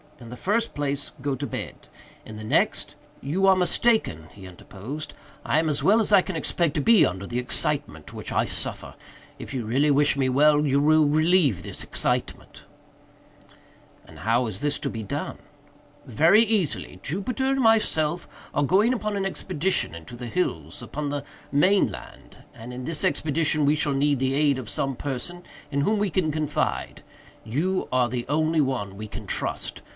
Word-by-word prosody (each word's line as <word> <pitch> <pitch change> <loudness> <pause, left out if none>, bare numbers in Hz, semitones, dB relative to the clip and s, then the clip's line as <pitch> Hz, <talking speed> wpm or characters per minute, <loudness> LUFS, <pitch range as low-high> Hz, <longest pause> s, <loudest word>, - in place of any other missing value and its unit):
In 120 -2 -11
the 125 - -7
first 225 - 0
place, 145 -1 -2
go 140 0 -1
to - - -4
bed. - - -7 0.4
In 110 - -9
the 110 - -8
next—" 110 - 0 0.3
"You 180 +8 +1
are 190 - +7
mistaken," 180 - +1
he 100 -2 -13
interposed, 110 - -8 0.3
"I - - +1
am 160 0 +2
as 150 -2 0
well 215 +3 +5
as 215 - +1
I 200 -2 +7
can 185 -1 -5
expect 160 0 -1
to 150 - +1
be 220 +5 +6
under 95 +2 -3
the 120 +4 -3
excitement 140 - -2
which - - -7
I - - +1
suffer. - - -4 0.4
If - - -8
you 130 -3 -2
really 135 +7 +2
wish 145 0 +3
me 130 -1 +1
well, 150 +3 +4
you 140 -1 +2
will 155 +1 +4
relieve 155 - +3
this - - -5
excitement." - - -2 1.4
"And - - -14
how 120 +2 +1
is 105 -4 -5
this 145 0 0
to 145 -2 -3
be 115 - -5
done?" 100 - -5 0.7
"Very 170 - +5
easily. 210 -8 -1
Jupiter 200 - -2
and 270 0 +1
myself 175 -8 +2 0.3
are 145 - +1
going 200 - +3
upon 215 -4 -2
an 195 -1 -1
expedition 185 - -1
into 85 +8 -10
the 120 0 -7
hills, 90 - -2
upon 150 0 -4
the 145 -1 -3 0.3
main 185 - +3
land, 85 - -12 0.2
and, 115 +2 -10
in 125 +1 -6
this 160 0 -2
expedition 155 -1 +1
we 145 +2 +3
shall 150 -2 +1
need 140 0 +1
the 130 0 0
aid 145 -2 +2
of 115 -4 -7
some 135 +7 -1
person 145 +8 -4 0.3
in 140 0 0
whom 210 +9 +2
we 205 -1 0
can 155 -2 +1
confide. 150 -1 -2 0.4
You 160 +12 -1
are 125 -1 +2
the 120 0 -4
only 155 +2 +2
one 105 -8 -2
we 110 +1 -6
can - - -8
trust. - - -3
145 Hz, 180 wpm, -25 LUFS, 125-175 Hz, 1.4 s, are